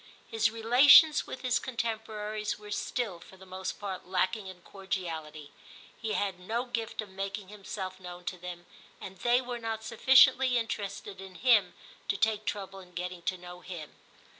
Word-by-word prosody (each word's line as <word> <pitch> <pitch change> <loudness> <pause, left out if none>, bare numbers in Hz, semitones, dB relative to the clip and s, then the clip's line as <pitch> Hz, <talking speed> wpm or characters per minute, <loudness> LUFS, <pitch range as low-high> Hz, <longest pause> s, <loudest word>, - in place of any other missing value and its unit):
His 225 0 +1
relations 255 +7 +7
with - - -7
his 245 -2 +1
contemporaries 220 -3 -3
were 210 0 -11
still, 210 -4 -2
for 190 - -15
the 190 - -14
most 185 0 -5
part, 195 -3 -5
lacking 190 +3 0
in 180 -2 -11
cordiality. 160 -6 -5 0.4
He 220 -2 -3
had 195 -3 -1
no 225 +7 -2
gift 230 -3 -3
of 210 - -13
making 195 0 -5
himself 190 -2 -6
known 180 -1 -9
to 180 - -3
them, 175 0 -8 0.3
and 190 -1 -9
they 245 +1 +3
were 245 -1 -5
not 225 -1 -4
sufficiently 260 +2 +5
interested 205 -3 -4
in 190 -1 -11
him 215 -7 +4 0.3
to 200 - 0
take 215 0 +1
trouble 195 -1 -4
in 180 -1 -15
getting 180 0 -4
to 185 +2 -2
know 180 0 -10
him. 170 -5 -8
200 Hz, 165 wpm, -30 LUFS, 185-225 Hz, 0.4 s, relations